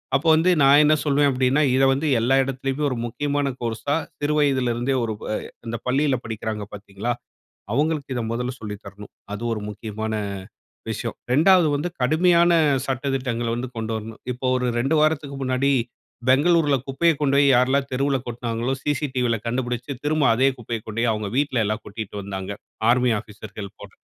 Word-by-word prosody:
அப்போ 140 +4 0
வந்து 165 +3 +3
நான் 140 +2 +7
என்ன 155 +1 +5
சொல்வேன் 145 0 +3
அப்படின்னா, 130 +3 +2
இத 135 - +3
வந்து 140 +4 -1
எல்லா 130 +3 +3
இடத்திலேயுமே 135 +2 -3
ஒரு 125 - -3
முக்கியமான 145 +4 -1
கோர்ஸா 120 +5 -1 0.2
சிறு 145 +1 0
வயதிலிருந்தே 130 -2 +1
ஒரு 110 -1 -2 0.2
அ - - 0 0.3
இந்த 115 +1 -3
பள்ளியில 135 +1 +2
படிக்கிறாங்க 110 -1 -4
பாத்தீங்களா, 100 +3 -4 0.6
அவங்களுக்கு 150 -1 0
இத 120 - -1
மொதல 125 +2 -2
சொல்லி 105 -2 -5
தரணும். 100 +1 -11 0.2
அது 105 - -5
ஒரு 105 - -4
முக்கியமான 110 +1 -5 0.8
விஷயம். - - -4 0.2
2 170 +3 +5
வந்து 150 +5 -2
கடுமையான 170 +5 +4 0.4
சட்ட 135 +1 -2
திட்டங்கள்ல 120 -3 -2
வந்து 125 +1 -4
கொண்டு 110 0 -3
வரணும். 110 +1 -9
இப்போ 125 +2 -7
ஒரு 125 - -1 0.2
2 150 +5 +1
வாரத்துக்கு 145 -3 0
முன்னாடி 130 +2 +1 0.6
பெங்களூரில 150 +2 +4
குப்பைய 165 +5 +3
கொண்டு 140 -2 +2
போய் 140 0 +5
யாரெல்லாம் 130 +2 +3
தெருவில 135 +1 +1
கொட்னாங்களோ, 120 +1 -3
CCTVயில 130 -5 0
கண்டுபிடிச்சு, 125 +2 -2
திரும்ப 150 0 +1
அதே 130 +4 +3
குப்பையை 115 -1 -4
கொண்டு 110 +1 -5
போய் 120 -1 +2
அவங்க 105 -1 -2
வீட்லயெல்லாம் 115 -7 0
கொட்டிகிட்டு 105 -1 -7
வந்தாங்க, 95 0 -5 0.4
ஆர்மி 125 +1 +4
ஆஃபீசர்கள் 105 -1 -8
போல. 100 - -10
130 Hz, 160 wpm, -23 LUFS, 115-145 Hz, 0.8 s, நான்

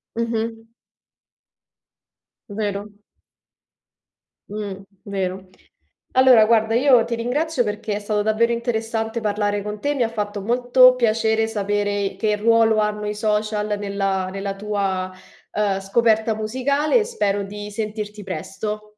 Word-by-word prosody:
Mh-mh. 225 -1 -3 1.8
Vero. 205 0 -3 1.6
Mh, 200 -2 -5 0.2
vero. 190 -1 -4 0.7
Allora 255 -4 +7
guarda, 225 0 +3
io 250 -2 +5
ti 235 0 -3
ringrazio 255 +4 0
perché 210 0 -3
è - - -1
stato 210 0 -1
davvero 220 +2 +2
interessante 225 -1 -2
parlare 205 -1 -1
con 210 0 -6
te, 290 0 0
mi 260 - 0
ha 225 - +2
fatto 210 -2 -4
molto 250 +3 +5
piacere 220 -1 +2
sapere 205 -2 -1
che 210 +1 +1
ruolo 225 0 +3
hanno 210 0 0
i 210 - -2
social 210 -1 -1
nella 195 -2 -1
nella 195 0 -4
tua, 195 -3 -2 0.4
uhm, 205 -2 0
scoperta 220 +2 +2
musicale 265 - +1
e 435 - +1
spero 205 - -1
di 205 +1 -7
sentirti 210 0 -5
presto. 210 +2 -5
215 Hz, 125 wpm, -22 LUFS, 205-230 Hz, 1.8 s, Allora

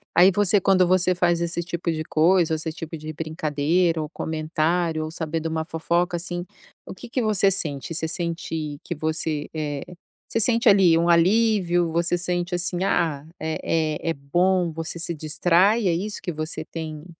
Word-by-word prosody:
Aí 180 +3 +7
você, 205 0 +4
quando 185 0 +3
você 185 0 +3
faz 175 -1 +2
esse 170 0 -2
tipo 170 0 -4
de 155 -1 -2
coisa, 165 +1 +2
esse 155 +1 -4
tipo 165 0 -7
de 155 +1 -7
brincadeira 160 +2 0
ou 150 - -5
comentário, 160 +1 -1
ou 155 - -7
saber 160 -1 -3
duma 160 0 -2
fofoca, 170 +2 -1
assim, 175 +1 -4 0.4
o - - -8
que 245 - -11
que 245 +2 -2
você 205 -3 +3
sente? 160 -5 -1
Você 160 0 -1
sente 165 -3 -4
que - - -4
você, 155 -1 -2
eh, 150 -3 -3 0.4
você 230 - 0
sente 230 +1 +3
ali 190 -5 +6
um 170 +1 +1
alívio, 175 -1 +3
você 170 +1 +1
sente, 175 0 -2
assim, 175 +1 0
ah, 160 -7 0
eh 160 0 -3 0.4
eh, 165 - -2
é - - +1
bom, 175 +5 +1
você 165 +1 -4
se 170 - 0
distrai, 180 +7 +2
é 170 - +2
isso 200 +5 -3
que 175 - -4
você 155 +1 -4
tem? 155 -2 -7
170 Hz, 180 wpm, -23 LUFS, 160-180 Hz, 0.4 s, Aí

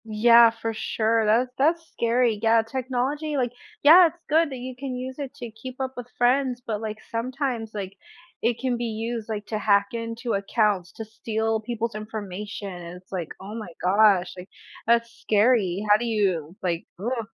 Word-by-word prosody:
Yeah, 230 +2 +6
for 225 0 -4
sure, 220 +1 0
that 235 +4 +3
that's 325 +4 +2
scary, 235 -2 +1
yeah, 225 0 +4
technology, 265 +5 -2
like 245 -3 0 0.3
Yeah, 340 +5 +9
it's 330 +1 -9
good 320 +1 +4
that 265 - -6
you 255 +1 -7
can 260 0 -5
use 255 +2 -6
it 275 -2 -6
to 240 -2 -7
keep 250 +4 -10
up 265 0 -2
with 245 -1 -7
friends, 250 0 +2
but, 215 -2 -3
like, 215 -1 -4
sometimes, 245 -1 -2
like, 200 -2 -5 0.5
it 230 0 +1
can 255 -2 0
be 240 - -2
used, 225 0 -4
like, 210 -1 -3
to 215 - -2
hack 200 -1 +3
into 230 +1 -3
accounts, 200 -3 +1
to 225 - -7
steal 220 0 -2
people's 230 0 -3
information, 210 -1 -6
it's 175 +1 -10
like, 175 -4 -3
"Oh 200 +2 -8
my 220 -3 -6 0.2
gosh," 190 -2 +4
like, 180 +1 -10 0.4
"that's 235 0 +3
scary, 210 -3 +2
how 210 0 +6
do 240 - -3
you," 190 -8 0
like 170 -2 -2
"Uh." 230 +2 -2
225 Hz, 180 wpm, -25 LUFS, 210-250 Hz, 0.5 s, Yeah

